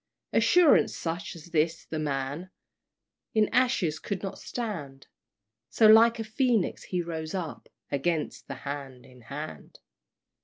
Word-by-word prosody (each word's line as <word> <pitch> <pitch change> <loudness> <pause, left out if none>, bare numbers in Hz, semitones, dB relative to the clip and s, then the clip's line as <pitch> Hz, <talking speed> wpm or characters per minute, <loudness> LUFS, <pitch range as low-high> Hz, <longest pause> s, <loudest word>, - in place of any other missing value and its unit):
Assurance 355 -4 +5
such 175 +4 -4
as 170 +1 -12
this 160 0 +1
the 160 - -4
man 145 +4 -3 0.9
In 215 -1 +4
ashes 225 -12 +2
could 200 -2 -4
not 195 - -5
stand; 160 - -5 0.6
So 225 - +3
like 225 +2 +7
a 225 - -3
Phoenix 230 -2 0
he 180 -2 -2
rose 160 0 -5
up 170 -5 -5 0.2
Against 150 +3 -1
the 135 - -5
Hand 135 -3 -6
in 125 -1 -17
Hand! 140 +7 -8
165 Hz, 130 wpm, -28 LUFS, 145-215 Hz, 0.9 s, like